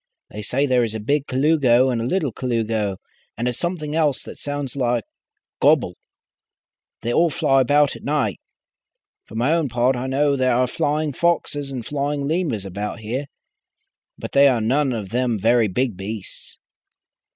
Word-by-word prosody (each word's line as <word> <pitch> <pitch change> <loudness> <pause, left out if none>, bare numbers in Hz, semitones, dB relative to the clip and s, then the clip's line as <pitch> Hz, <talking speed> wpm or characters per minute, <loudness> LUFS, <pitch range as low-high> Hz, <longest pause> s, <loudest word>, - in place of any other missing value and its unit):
They 105 - -6
say 130 +7 0
there 125 -3 +3
is 110 -1 -3
a - - -3
Big 140 +6 0
Colugo 130 -2 +3
and 120 -2 -1
a - - -2
Little 150 -1 0
Colugo, 110 -5 -1 0.4
and 120 +2 -1
a 125 - 0
something 155 0 -3
else 150 -5 +1
that - - -10
sounds 145 -2 -4
like 120 -4 0 0.6
gobble. - - +3 1.1
They 120 - -1
all 170 +5 +4
fly 135 -2 +2
about 145 +2 +3
at - - -11
night. 140 -9 0 0.9
For - - -13
my 125 +7 +2
own 165 -4 +1
part, 125 +2 +2
I 125 +1 -3
know 140 +2 +2
there 130 -2 +2
are 125 +1 +3
flying 150 +1 -1
foxes 145 -3 0
and 125 -4 -5
flying 145 0 -2
lemurs 150 - -1
about 105 +4 -5
here, 125 +6 -3 0.9
but - - -7
they 140 0 +6
are 125 -4 +3
none 130 +5 +1
of 105 -5 -4
them 120 0 0
very 115 +2 +3
big 120 +3 -1
beasts." 100 +1 -7
130 Hz, 170 wpm, -22 LUFS, 115-145 Hz, 1.1 s, they